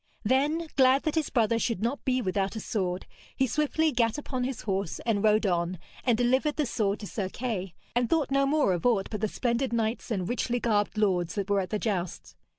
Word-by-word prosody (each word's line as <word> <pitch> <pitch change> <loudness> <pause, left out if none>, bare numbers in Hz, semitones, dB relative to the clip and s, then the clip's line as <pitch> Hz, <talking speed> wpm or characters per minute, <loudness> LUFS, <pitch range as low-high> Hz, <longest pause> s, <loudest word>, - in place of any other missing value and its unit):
Then, 290 +8 +2
glad 265 +1 +5
that 310 - 0
his 320 -3 0
brother 230 -2 +2
should 225 -4 -1
not 245 +5 -1
be 255 -1 +1
without 195 +1 -1
a - - -3
sword, 185 -4 -2 0.3
he 265 - +2
swiftly 300 +5 +1
gat 230 -2 +1
upon 255 -4 -3
his 260 -3 -4
horse 195 -4 -2
and 220 -3 +1
rode 215 +1 +4
on, 175 -1 0 0.3
and 240 -3 +3
delivered 260 +5 +2
the 300 - +1
sword 210 -4 -1
to - - -5
Sir 195 -2 -3
Kay, 195 -6 -4 0.2
and 240 -1 +2
thought 310 -4 +1
no 275 0 +3
more 285 -9 +3
of 175 - -3
aught 225 -6 +2
but 210 -2 -4
the 215 - +2
splendid 240 +4 -1
knights 230 +1 -1
and 190 -6 -1
richly 245 +1 -1
garbed 210 -3 0
lords 185 -5 +1
that 200 -1 -2
were 200 - +3
at 185 - -3
the 215 - 0
jousts. 175 - -3
225 Hz, 220 wpm, -28 LUFS, 200-260 Hz, 0.3 s, glad